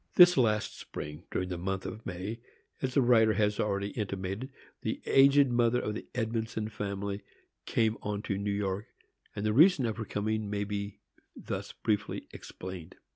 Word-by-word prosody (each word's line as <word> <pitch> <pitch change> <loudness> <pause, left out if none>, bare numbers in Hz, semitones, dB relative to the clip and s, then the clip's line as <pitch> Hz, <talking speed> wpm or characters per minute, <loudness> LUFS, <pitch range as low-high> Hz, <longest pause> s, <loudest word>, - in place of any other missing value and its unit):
This 180 0 +9
last 110 -5 +1
spring, 75 +3 -7
during 90 0 -2
the 90 -2 -3
month 95 +1 -2
of 110 0 -6
May, 95 +5 -4 0.4
as 130 -1 -2
the 140 - +5
writer 110 -3 +5
has 105 0 +1
already 100 -1 0
intimated, 100 +3 -3 0.3
the - - -2
aged 140 0 +6
mother 120 0 +3
of 105 - -2
the 110 - -6
Edmondson 110 -2 -2
family 100 -1 -3 0.5
came 110 -1 +1
on 105 0 -3
to 100 - -1
New 100 +1 -2
York, 100 0 -1 0.5
and 100 - -3
the 105 - +2
reason 155 - +6
of 110 -2 -2
her 115 - -3
coming 110 +1 -1
may 105 0 -1
be 100 0 -4 0.3
thus - - -5
briefly 105 -1 -1
explained. 90 -3 -8
105 Hz, 170 wpm, -30 LUFS, 100-115 Hz, 0.5 s, This